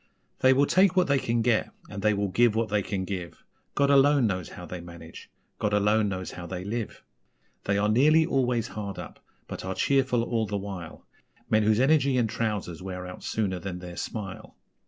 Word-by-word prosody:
They 130 - +5
will 135 +2 +4
take 185 +3 +3
what 185 -1 +4
they 140 -3 +2
can 115 -2 0
get, 115 -2 +2 0.2
and 100 - -7
they 105 0 +2
will 100 0 -1
give 115 +3 +3
what 115 0 0
they 105 0 +1
can 95 0 -3
give, 90 -3 -6 0.3
God 140 0 +3
alone 140 -1 +5
knows 95 -5 -2
how 90 - -9
they 90 0 -7
manage 85 -1 -11 0.3
God 105 0 0
alone 105 +1 +3
knows 95 -1 -4
how 85 -1 -8
they 90 +1 -5
live! 110 +2 -5 0.6
They 100 0 +1
are 105 +1 +2
nearly 150 +9 +4
always 125 -5 0
hard 100 -2 -6
up, - - -9 0.3
but - - -7
are 95 0 -4
cheerful 130 -4 +2
all 115 -2 -1
the 100 - -2
while 95 -4 -7 0.5
Men 110 - +4
whose 110 +1 +3
energy 140 -1 +3
and 120 -2 +2
trousers 105 -7 -3
wear 90 -1 -6
out 90 0 -9
sooner 95 -5 -1
than 95 -1 -5
their 90 -1 -9
smile! 100 -2 -6
105 Hz, 200 wpm, -27 LUFS, 95-125 Hz, 0.6 s, They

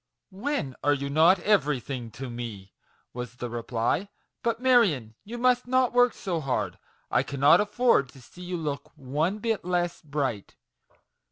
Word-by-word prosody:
"When 195 - -2
are 145 0 +4
you 140 0 -4
not 165 +6 +6
everything 140 - 0
to 135 +1 -6
me?" 115 -5 -7 0.4
was 125 0 -6
the 120 -1 -6
reply. 120 - -1 0.2
" - - -54
But, 230 -1 -1
Marion, 210 - +3
you 235 +4 -7
must 250 0 +2
not 255 -1 +2
work 245 0 +4
so 180 -6 -2
hard; 135 -4 -2 0.3
I - - +4
cannot 140 +7 +4
afford 210 - +2
to 135 - -15
see 180 - -15
you 180 0 -4
look 150 -3 -4
one 150 +8 -1
bit 225 0 -1
less 175 -1 -1
bright. 140 - -3
150 Hz, 160 wpm, -27 LUFS, 130-210 Hz, 0.4 s, not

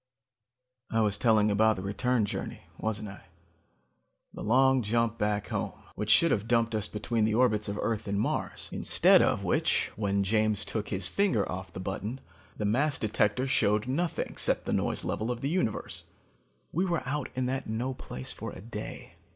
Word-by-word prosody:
"I 115 - +1
was 105 -2 +1
telling 110 -3 +4
about 110 +1 +4
the 95 - -6
return 115 +3 +1
journey, 100 - -5
wasn't 110 -1 -3
I? 95 - -12 1.1
The - - -8
long 130 +3 +4
jump 115 +1 0
back 105 -1 0
home, - - -2 0.2
which 105 - -4
should 170 +8 +6
have 105 +1 0
dumped 115 -1 +2
us 105 -1 0
between 110 +2 -1
the 110 0 +2
orbits 110 -4 +2
of 100 0 -3
Earth 110 -2 -1
and 100 0 0
Mars. - - -2
Instead - - +5
of - - +1
which, - - +1
when 100 -1 0
James 105 0 +1
took 110 -2 -3
his 95 -2 +2
finger 125 - +1
off 90 -1 -6
the 90 - -8
button, 100 +7 -4 0.4
the 105 - -2
mass 140 +8 +2
detector 110 +3 +1
showed 105 -4 +2
nothing 165 +6 -1
except - - -1
the - - -1
noise - - 0
level 110 +2 -2
of 120 -1 -3
the 140 - -1
universe. 165 - -2 0.7
"We 175 - +1
were 170 -7 -1
out 145 0 -2
in 130 0 0
that 130 +1 -2
no 120 +4 -2
place 65 - -7
for - - -6
a - - -9
day. 105 +1 -8
110 Hz, 185 wpm, -29 LUFS, 105-125 Hz, 1.1 s, should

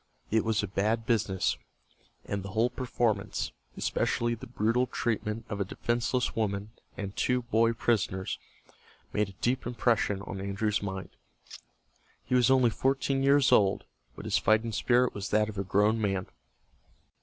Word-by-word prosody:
It 110 0 +3
was 110 -2 +1
a - - -1
bad 110 +4 0
business, 105 -6 +1 0.7
and 100 -1 -3
the 95 0 -8
whole 115 +3 +2
performance, 115 -5 -1 0.3
especially 120 0 0
the 115 - -8
brutal 115 +2 +1
treatment 110 -2 -2
of 105 -2 -4
a - - +3
defenseless 120 +5 -1
woman 105 -1 -1 0.3
and 100 0 -5
two 125 -1 +1
boy 115 0 +2
prisoners, 100 -5 -1 0.7
made 105 -1 +1
a - - -12
deep 125 +1 +1
impression 115 -5 +1
on 95 -1 -6
Andrew's 100 +2 -1
mind. 95 -2 -5 1.2
He - - -3
was 125 -1 +5
only 130 -3 +5
fourteen 135 +2 0
years 140 0 +4
old, 100 -1 +4 0.3
but - - -9
his - - +2
fighting 110 +2 +2
spirit 125 +3 +2
was 100 -1 -5
that 105 0 +2
of 100 -2 -6
a - - 0
grown 105 +4 +2
man. 95 -3 0
110 Hz, 155 wpm, -29 LUFS, 100-120 Hz, 1.2 s, was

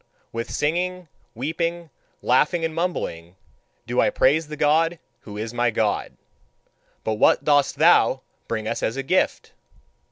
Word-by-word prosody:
With 115 0 -4
singing, 180 +3 -2 0.3
weeping, 165 +5 -3 0.3
laughing, 155 +7 +2
and 160 - -3
mumbling 95 - -3 0.5
do - - +1
I - - +3
praise 150 +4 +2
the 150 0 -7
God 165 +4 +2 0.2
who 105 -1 -10
is 110 +2 -5
my 120 0 +1
God. 110 -2 -1 0.9
But 110 -1 -2
what - - +4
dost 145 -2 +3
thou - - +4 0.3
bring 110 -1 -3
us - - -2
as 115 - -1
a 135 - -2
gift?" 185 +8 0
145 Hz, 140 wpm, -23 LUFS, 115-165 Hz, 0.9 s, what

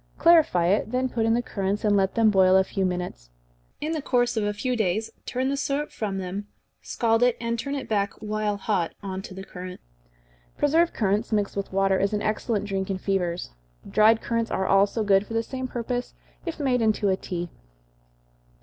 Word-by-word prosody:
Clarify 320 - +5
it, 200 +4 +2
then 255 +1 0
put 225 -2 0
in 225 - +3
the 240 - 0
currants, 200 0 -2
and 205 -1 +4
let 195 -1 +1
them 225 -2 +4
boil 190 -1 +5
a 190 - +5
few 190 0 -1
minutes. 180 - -5 0.5
In 310 - -2
the 315 -2 -2
course 245 -3 +1
of 220 - 0
a 205 - +1
few 250 +5 -2
days 215 0 0 0.2
turn 260 +1 -1
the 280 - 0
syrup 280 +1 -2
from 200 -3 -3
them, 190 +2 -5 0.3
scald 225 -1 +1
it, 245 -1 +3
and 235 0 -2
turn 280 +4 -3
it 275 - -5
back, 200 -2 0
while 215 -1 -2
hot, 195 -4 -1
on 190 -1 -4
to 190 - -10
the 190 - -7
currants. 180 -1 -9 0.7
Preserved 325 +4 +2
currants, 210 +1 0
mixed 205 -2 0
with 200 -1 -3
water, 195 0 +2
is 200 +2 0
an 210 - 0
excellent 215 -1 -1
drink 195 -1 -2
in 195 - -1
fevers. 180 - -2 0.4
Dried 220 +1 +4
currants 230 -1 -1
are 190 - -1
also 200 +3 +3
good 200 0 +3
for 225 - -5
the 225 - +1
same 260 +2 -5
purpose, 245 0 -4 0.3
if 330 -1 -4
made 255 -4 +1
into 215 -2 +2
a 190 - +3
tea. 175 -2 -5
210 Hz, 205 wpm, -25 LUFS, 195-240 Hz, 0.7 s, Clarify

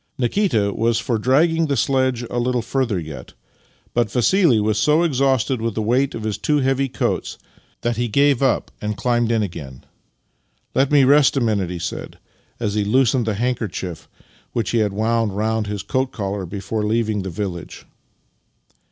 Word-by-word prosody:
Nikita 120 - +1
was 115 0 +1
for 115 0 -1
dragging 160 +7 +3
the 140 -2 0
sledge 130 -1 +1
a 120 - -1
little 125 -1 0
further 120 -4 -1
yet, 80 -5 -8 0.6
but 120 -3 +1
Vassili 130 - +3
was 105 0 +1
so 150 +7 +3
exhausted 135 -5 +1
with 115 -2 -2
the 110 - -1
weight 130 +5 +1
of 110 - -6
his 110 -1 -3
two 150 - +1
heavy 135 0 +1
coats - - -2 0.4
that 120 -1 -1
he 120 0 0
gave 140 +3 +3
up 135 -3 +1
and 105 0 -3
climbed 120 0 +1
in 115 -2 +2
again. 75 -9 -7 0.4
" - - -45
Let 135 +1 +2
me 145 -2 +6
rest 140 +1 +5
a - - +4
minute," 105 -7 0
he 90 - -4
said, 85 +1 -6 0.4
as 105 -4 -1
he 105 -1 +1
loosened 125 +2 +2
the 110 - 0
handkerchief 110 -7 -3 0.4
which 115 - -1
he 120 - +2
had 105 -2 +1
wound 110 0 0
round 110 0 0
his 100 -2 -4
coat 130 +5 -1
collar 100 -3 -4
before 100 +4 -3
leaving 110 -1 0
the 95 - -5
village. 90 -1 -6
115 Hz, 180 wpm, -21 LUFS, 105-130 Hz, 0.6 s, me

